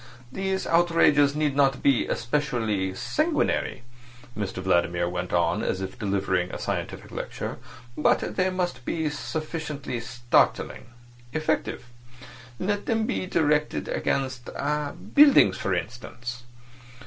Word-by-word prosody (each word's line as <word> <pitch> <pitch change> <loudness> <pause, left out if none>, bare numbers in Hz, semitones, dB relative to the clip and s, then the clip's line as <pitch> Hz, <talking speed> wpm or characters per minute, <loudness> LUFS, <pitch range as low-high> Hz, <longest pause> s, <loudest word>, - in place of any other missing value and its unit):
"These 190 +4 -2
outrages 165 -4 +4
need 150 -2 0
not 135 -2 +2
be 135 -4 +3
especially 115 -8 -1
sanguinary," 305 - 0 0.5
Mr 100 -2 -3
Vladimir 85 -2 +1
went 90 0 -3
on, 85 -1 +2
as 95 - -1
if 95 0 -6
delivering 95 -3 0
a - - -4
scientific - - -4
lecture, - - -5 0.4
"but 150 - +1
they 185 0 +2
must 180 -8 -2
be 160 +3 -1
sufficiently 150 -3 -4
startling—effective. 120 +2 -1 0.7
Let 205 +5 -2
them 225 -2 +1
be 185 - -2
directed 150 -4 +1
against 130 -3 -1 0.6
buildings, 280 - +7
for 95 - -2
instance. 120 +6 -5
130 Hz, 110 wpm, -26 LUFS, 105-160 Hz, 0.7 s, buildings